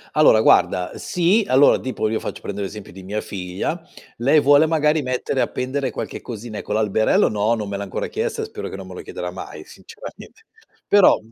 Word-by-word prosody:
Allora 150 -8 +6
guarda 90 -2 +3
sì, 185 +5 +1
allora 135 +2 +5
tipo 125 -4 -2
io 110 - -1
faccio, - - -6
prendo 100 0 -6
l'esempio 100 +1 -6
di 95 +2 -11
mia 105 +3 -4
figlia, 95 - -4 0.4
lei 140 +6 +4
vuole 145 +3 +5
magari 155 -1 +2
mettere 130 +1 -2
appendere 130 +2 -1
qualche - - -6
cosina, 115 -2 -7
ecco 105 - -5
l'alberello 110 0 +2
no 105 +2 +1
non 105 -3 -5
me 100 - -3
l'ha 100 - -4
ancora 95 - -4
chiesto 455 +1 -3
e 440 - -2
spero 435 - -7
che - - -7
non - - -9
me - - -10
lo - - -7
chiederà - - -6
mai - - -9
sinceramente - - -12 0.4
però 205 -2 +5
125 Hz, 195 wpm, -21 LUFS, 105-155 Hz, 0.4 s, Allora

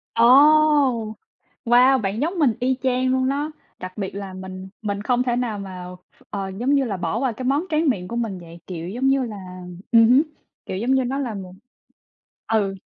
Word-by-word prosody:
Ồ! 230 - +3 1.4
Wow! 250 +2 +5
Bạn 200 +1 -2
giống 340 +4 -1
mình 275 -7 +4
y 260 +1 +1
chang 255 0 +1
luôn 260 0 +1
đó, 290 +3 -2 0.3
đặc 185 +2 -8
biệt 195 -2 -4
là 200 -1 -6
mình 185 0 -8
mình 200 -2 -3
không 245 +3 +1
thể 245 -1 0
nào 240 -4 -2
mà 185 -2 -7 0.3
ph - - -22
ờ, 195 -1 -4
giống 260 +4 +1
như 275 - +3
là, 205 -5 -3
bỏ 175 +5 -2
qua 260 -1 0
cái 245 +3 -7
món 280 +6 +1
tráng 310 -1 +2
miệng 185 -8 -2
của 235 - -6
mình 225 -6 -2
vậy. 170 0 -12
Kiểu 170 -2 -6
giống 250 +7 -1
như 270 0 +3
là 215 -3 -7 0.5
ừm 230 -1 +7
hứm, 255 +3 +6 0.4
kiểu, 185 - -4
giống 235 +6 -1
như 265 -1 +3
nó 255 +2 -2
là 260 -5 -3
một 190 -3 -8 1.0
ừ. 200 -3 +1
230 Hz, 210 wpm, -22 LUFS, 195-260 Hz, 1.4 s, ừm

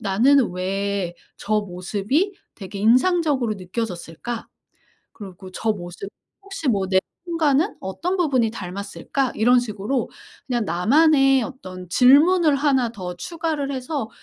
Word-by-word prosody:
나는 235 +6 +3
왜 190 0 -2 0.2
저 215 0 0
모습이 205 - -1 0.2
되게 195 -1 -8
인상적으로 255 - +3
느껴졌을까? 190 +2 -5 0.6
그러고 190 -2 -11
저 220 +4 -1
모습 175 0 -8 0.3
혹시 390 -6 -5
뭐 200 -5 +1
내 190 0 +3 0.3
순간은 330 +1 +1
어떤 320 - -3
부분이 265 -10 +2
닮았을까?' 200 +6 -4
이런 245 +3 +4
식으로 220 +2 -3 0.4
그냥 240 -4 -1
나만의 270 - +4
어떤 185 -9 -9
질문을 295 - +5
1 270 -4 +2
더 185 -5 -6
추가를 310 - -3
해서 260 -1 -3
235 Hz, 260 characters per minute, -22 LUFS, 195-285 Hz, 0.6 s, 질문을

